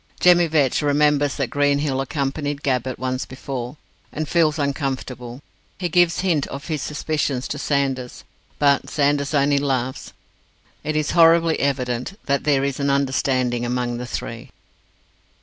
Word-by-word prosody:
Jemmy 175 Hz, -1 st, +5 dB
Vetch 150 Hz, -4 st, +2 dB
remembers 145 Hz, -1 st, +2 dB
that 130 Hz, -4 st, -2 dB
Greenhill 145 Hz, -1 st, +1 dB
accompanied 140 Hz, +1 st, -3 dB
Gabbett 130 Hz, -2 st, -1 dB
once 130 Hz, 0 st, -2 dB
before, 130 Hz, +1 st, -6 dB, 0.3 s
and 155 Hz, 0 st, -4 dB
feels 160 Hz, -2 st, +2 dB
uncomfortable. 135 Hz, -3 st, -3 dB, 0.3 s
He 180 Hz, -2 st, -2 dB
gives 175 Hz, +1 st, +3 dB
hint 170 Hz, -7 st, +1 dB
of 140 Hz, +5 st, -8 dB
his 155 Hz, -3 st, -2 dB
suspicions 150 Hz, -4 st, -2 dB
to 145 Hz, -, -4 dB
Sanders, 135 Hz, -4 st, -1 dB, 0.3 s
but 140 Hz, -1 st, +2 dB
Sanders 145 Hz, 0 st, +1 dB
only 140 Hz, 0 st, +3 dB
laughs. 130 Hz, -2 st, -2 dB, 0.7 s
It 155 Hz, -, -2 dB
is 155 Hz, -1 st, 0 dB
horribly 165 Hz, -1 st, +5 dB
evident 125 Hz, +4 st, -1 dB
that 140 Hz, -1 st, 0 dB
there 140 Hz, -2 st, +3 dB
is 140 Hz, -1 st, -2 dB
an 140 Hz, 0 st, 0 dB
understanding 130 Hz, -3 st, +1 dB
among 120 Hz, 0 st, -1 dB
the 125 Hz, 0 st, -6 dB
three. -, -, -6 dB
140 Hz, 140 wpm, -22 LUFS, 130-150 Hz, 0.7 s, Jemmy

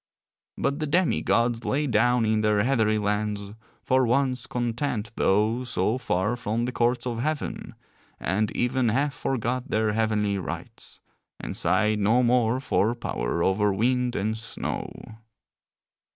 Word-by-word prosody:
But 140 Hz, +2 st, -1 dB
the 155 Hz, -, -2 dB
demi 175 Hz, +4 st, +2 dB
gods 115 Hz, 0 st, +1 dB
lay 145 Hz, +3 st, 0 dB
down 120 Hz, -2 st, +2 dB
in 110 Hz, 0 st, +2 dB
their 105 Hz, -1 st, +2 dB
heathery 110 Hz, -4 st, +2 dB
lands, 105 Hz, -1 st, -2 dB, 0.3 s
for 130 Hz, 0 st, +3 dB
once 130 Hz, +1 st, +1 dB
content 120 Hz, -2 st, -2 dB
though 110 Hz, +5 st, +2 dB
so 115 Hz, 0 st, -1 dB
far 105 Hz, -2 st, 0 dB
from 115 Hz, 0 st, -2 dB
the 125 Hz, -, -2 dB
courts 120 Hz, 0 st, 0 dB
of 120 Hz, -2 st, -3 dB
heaven, 150 Hz, +3 st, -3 dB, 0.4 s
and 100 Hz, +4 st, 0 dB
even 125 Hz, 0 st, +1 dB
half 140 Hz, +5 st, +1 dB
forgot 125 Hz, -2 st, -2 dB
their 110 Hz, -1 st, +1 dB
heavenly 105 Hz, -2 st, 0 dB
rights, 90 Hz, -, -7 dB, 0.4 s
and -, -, -6 dB
sighed 105 Hz, 0 st, +2 dB
no 110 Hz, +5 st, +3 dB
more 120 Hz, 0 st, +2 dB
for 120 Hz, -3 st, +1 dB
power 85 Hz, -, -2 dB
over 100 Hz, +2 st, +2 dB
wind 125 Hz, +4 st, +1 dB
and 110 Hz, +2 st, -1 dB
snow. 115 Hz, -, -5 dB
115 Hz, 140 wpm, -26 LUFS, 105-125 Hz, 0.4 s, for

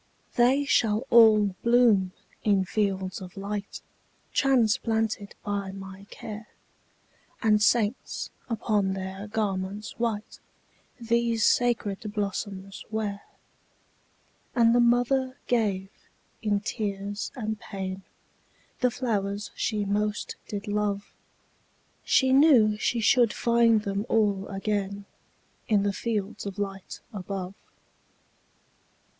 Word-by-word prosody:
``They 265 Hz, +4 st, +3 dB
shall 220 Hz, -2 st, +2 dB
all 215 Hz, -4 st, +6 dB
bloom 230 Hz, -6 st, +4 dB, 0.3 s
in 200 Hz, -3 st, +3 dB
fields 190 Hz, -1 st, -1 dB
of 185 Hz, +1 st, -10 dB
light, 200 Hz, +1 st, -5 dB, 0.5 s
Transplanted 225 Hz, -5 st, +1 dB
by 200 Hz, -2 st, -2 dB
my 195 Hz, 0 st, -10 dB
care, 215 Hz, 0 st, -8 dB, 1.0 s
And 210 Hz, -1 st, +4 dB
saints, 220 Hz, +2 st, +1 dB, 0.2 s
upon 210 Hz, -4 st, 0 dB
their 190 Hz, +1 st, -5 dB
garments 205 Hz, -1 st, -2 dB
white, 225 Hz, -3 st, -2 dB, 0.6 s
These 235 Hz, -1 st, +1 dB
sacred 230 Hz, -5 st, +2 dB, 0.2 s
blossoms 195 Hz, -1 st, -4 dB
wear.'' 210 Hz, -2 st, -3 dB, 1.3 s
And 230 Hz, -2 st, +5 dB
the 245 Hz, -, +4 dB
mother 245 Hz, +2 st, +2 dB
gave, 200 Hz, -5 st, 0 dB, 0.5 s
in 205 Hz, -2 st, +1 dB
tears 205 Hz, -1 st, -3 dB
and 220 Hz, -4 st, -3 dB
pain, 190 Hz, -1 st, -5 dB, 0.8 s
The 250 Hz, -, +3 dB
flowers 210 Hz, -5 st, -2 dB
she 210 Hz, -2 st, -1 dB
most 210 Hz, +1 st, -1 dB
did 205 Hz, 0 st, -5 dB
love; 205 Hz, -1 st, -2 dB, 0.9 s
She 260 Hz, -1 st, +3 dB
knew 265 Hz, -7 st, +6 dB
she 230 Hz, +2 st, 0 dB
should 235 Hz, 0 st, +4 dB
find 235 Hz, -2 st, +3 dB
them 200 Hz, +2 st, -2 dB
all 205 Hz, -3 st, +2 dB
again 200 Hz, 0 st, -2 dB, 0.6 s
In 210 Hz, -3 st, +3 dB
the 200 Hz, -1 st, 0 dB
fields 210 Hz, -1 st, -3 dB
of 195 Hz, -, -6 dB
light 195 Hz, -2 st, -5 dB
above. 190 Hz, -1 st, -5 dB
210 Hz, 105 wpm, -27 LUFS, 200-230 Hz, 1.3 s, all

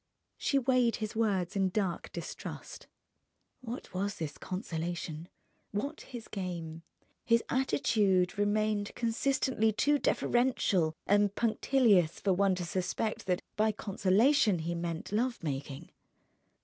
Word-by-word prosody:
She 280 Hz, -, +1 dB
weighed 250 Hz, -3 st, +3 dB
his 215 Hz, 0 st, -4 dB
words 200 Hz, -5 st, 0 dB
in 195 Hz, -1 st, +2 dB
dark 185 Hz, -3 st, -2 dB
distrust. -, -, -7 dB, 0.7 s
What 240 Hz, -5 st, -7 dB
was 200 Hz, +3 st, -2 dB
this 150 Hz, -3 st, -5 dB
consolation? 170 Hz, -3 st, -4 dB, 0.4 s
What 280 Hz, +10 st, -3 dB
his 240 Hz, -4 st, -9 dB
game? 170 Hz, -4 st, -5 dB, 0.4 s
His 230 Hz, -1 st, +3 dB
attitude 205 Hz, -8 st, +2 dB
remained 205 Hz, 0 st, 0 dB
consistently 235 Hz, -1 st, +1 dB
too 290 Hz, +7 st, +2 dB
deferential 205 Hz, -14 st, +1 dB
and 205 Hz, 0 st, +3 dB
punctilious 220 Hz, -7 st, +3 dB
for 195 Hz, -, +2 dB
one 195 Hz, 0 st, +3 dB
to 180 Hz, -1 st, -4 dB
suspect 190 Hz, +5 st, -2 dB
that 180 Hz, -1 st, 0 dB
by 215 Hz, +1 st, +3 dB
consolation 205 Hz, +3 st, +3 dB
he 170 Hz, -, -1 dB
meant 170 Hz, 0 st, -4 dB
love 235 Hz, +1 st, -1 dB
making. 140 Hz, -2 st, -5 dB
205 Hz, 120 wpm, -31 LUFS, 180-230 Hz, 0.7 s, weighed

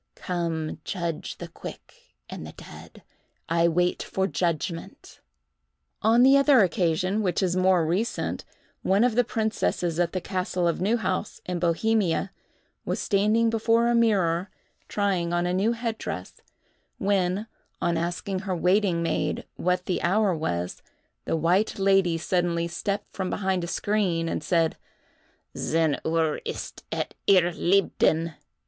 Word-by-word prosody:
_"—"Come, 165 Hz, -3 st, -3 dB
judge 170 Hz, -5 st, -4 dB
the -, -, -7 dB
quick 65 Hz, -, -12 dB
and -, -, -7 dB
the -, -, -10 dB
dead! -, -, -13 dB, 0.4 s
I 170 Hz, +1 st, +3 dB
wait 175 Hz, +2 st, +1 dB
for 190 Hz, -, -1 dB
judgment." 170 Hz, -2 st, -3 dB, 0.8 s
On 230 Hz, +3 st, +5 dB
the 270 Hz, +2 st, +7 dB
other 275 Hz, -3 st, +6 dB
occasion, 185 Hz, +2 st, +1 dB
which 185 Hz, -1 st, 0 dB
is 180 Hz, -1 st, +1 dB
more 185 Hz, -2 st, +3 dB
recent, 190 Hz, +9 st, -1 dB, 0.4 s
one 195 Hz, +4 st, +3 dB
of 245 Hz, -2 st, +3 dB
the 245 Hz, +2 st, +3 dB
princesses 215 Hz, -7 st, -1 dB
at 170 Hz, -1 st, +2 dB
the 185 Hz, -, -2 dB
castle 180 Hz, -1 st, -1 dB
of 170 Hz, -, -1 dB
Neuhaus, 215 Hz, +1 st, -1 dB
in 180 Hz, -1 st, -3 dB
Bohemia, 180 Hz, +1 st, +1 dB, 0.5 s
was -, -, -2 dB
standing 215 Hz, +3 st, +2 dB
before 230 Hz, +1 st, +2 dB
a -, -, +3 dB
mirror, 195 Hz, -6 st, +2 dB, 0.4 s
trying 185 Hz, -4 st, 0 dB
on 175 Hz, 0 st, +1 dB
a 180 Hz, -, 0 dB
new 205 Hz, +5 st, +2 dB
head 230 Hz, -1 st, -3 dB
dress, 90 Hz, +1 st, -6 dB, 0.6 s
when, 195 Hz, 0 st, 0 dB, 0.3 s
on 170 Hz, -, 0 dB
asking 175 Hz, +3 st, -2 dB
her 190 Hz, -1 st, -3 dB
waiting 180 Hz, 0 st, +2 dB
maid 165 Hz, -, -1 dB
what 180 Hz, 0 st, 0 dB
the 180 Hz, -, -1 dB
hour 195 Hz, +1 st, +2 dB
was, 90 Hz, -, -3 dB, 0.4 s
the -, -, 0 dB
white 175 Hz, +6 st, +1 dB
lady 195 Hz, -3 st, +3 dB
suddenly 170 Hz, 0 st, 0 dB
stepped 200 Hz, +4 st, -3 dB
from 190 Hz, -2 st, -2 dB
behind 190 Hz, -3 st, -1 dB
a -, -, -3 dB
screen 180 Hz, -4 st, 0 dB
and -, -, -2 dB
said: 165 Hz, -3 st, +1 dB, 0.8 s
"Zehn 160 Hz, -3 st, +1 dB
uhr 160 Hz, -1 st, 0 dB
ist -, -, -6 dB
es -, -, -1 dB, 0.2 s
ihr 180 Hz, -3 st, +5 dB
liebden!" 170 Hz, -3 st, +2 dB
180 Hz, 140 wpm, -26 LUFS, 170-205 Hz, 0.8 s, the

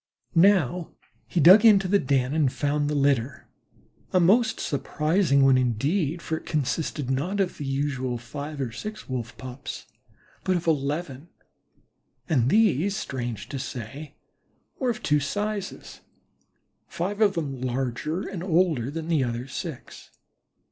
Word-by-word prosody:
Now 180 Hz, -2 st, +3 dB, 0.3 s
he 175 Hz, -, -1 dB
dug 185 Hz, +7 st, +8 dB
into 200 Hz, -4 st, +6 dB
the 200 Hz, +2 st, +3 dB
den 130 Hz, -2 st, 0 dB
and 150 Hz, -5 st, +2 dB
found 145 Hz, +1 st, 0 dB
the 150 Hz, -, -1 dB
litter, 140 Hz, -2 st, 0 dB, 0.6 s
a 185 Hz, -, +3 dB
most 210 Hz, +7 st, +3 dB
surprising 150 Hz, 0 st, +1 dB
one 130 Hz, -1 st, +5 dB
indeed, 145 Hz, -, 0 dB
for 160 Hz, -, -2 dB
it -, -, -11 dB
consisted 145 Hz, -2 st, -2 dB
not 175 Hz, +10 st, -1 dB
of 190 Hz, -2 st, -1 dB
the 145 Hz, -, -4 dB
usual 135 Hz, -3 st, -1 dB
five 145 Hz, +5 st, -7 dB
or 130 Hz, -4 st, -2 dB
six 215 Hz, -, -7 dB
Wolf 125 Hz, -2 st, -5 dB
pups, 130 Hz, +1 st, -8 dB, 0.6 s
but 185 Hz, -, +1 dB
of 170 Hz, -, -6 dB
eleven, 150 Hz, -1 st, -1 dB, 1.0 s
and 130 Hz, -, +2 dB
these, 200 Hz, -, +3 dB
strange 120 Hz, -4 st, -4 dB
to 135 Hz, -, -4 dB
say, 135 Hz, +5 st, -7 dB, 0.6 s
were 255 Hz, -, 0 dB
of 235 Hz, -, -3 dB
two 150 Hz, 0 st, +3 dB
sizes, 205 Hz, +7 st, -4 dB, 0.9 s
five 200 Hz, +5 st, -3 dB
of 205 Hz, -2 st, +4 dB
them 140 Hz, -6 st, -3 dB
larger 130 Hz, +6 st, -2 dB
and 190 Hz, -4 st, -6 dB
older 165 Hz, -8 st, +1 dB
than 160 Hz, +2 st, -5 dB
the 160 Hz, -5 st, +2 dB
other 120 Hz, +1 st, -3 dB
six. 150 Hz, -1 st, -7 dB
150 Hz, 140 wpm, -25 LUFS, 130-180 Hz, 1.0 s, dug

